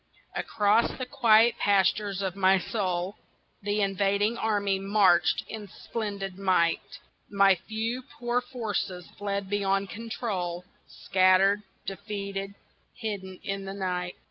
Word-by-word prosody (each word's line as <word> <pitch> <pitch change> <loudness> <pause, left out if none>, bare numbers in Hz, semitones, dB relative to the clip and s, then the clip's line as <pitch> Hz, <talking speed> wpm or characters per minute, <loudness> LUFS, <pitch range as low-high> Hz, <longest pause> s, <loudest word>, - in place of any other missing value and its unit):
ACROSS 210 +2 +2
the 255 - -3
quiet 235 -3 +4
pastures 200 0 +2
of 190 -1 -2
my 190 0 +4
soul 185 -1 -2 0.4
The 205 +1 0
invading 200 +2 +1
army 205 -4 0
marched 195 -3 +3
in 215 -2 -7
splendid 200 -2 -5
might 180 -3 +1 0.3
My 195 -1 +5
few 225 +3 -2 0.2
poor 240 0 0
forces 210 -7 -3
fled 200 -1 -2
beyond 195 -1 0
control, 195 -6 -4 0.2
Scattered, 190 +2 +3 0.2
defeated, 200 0 -5 0.4
hidden 200 -5 -5
in 195 0 -3
the 195 0 -5
night. 180 -2 -2
200 Hz, 115 wpm, -28 LUFS, 190-215 Hz, 0.4 s, My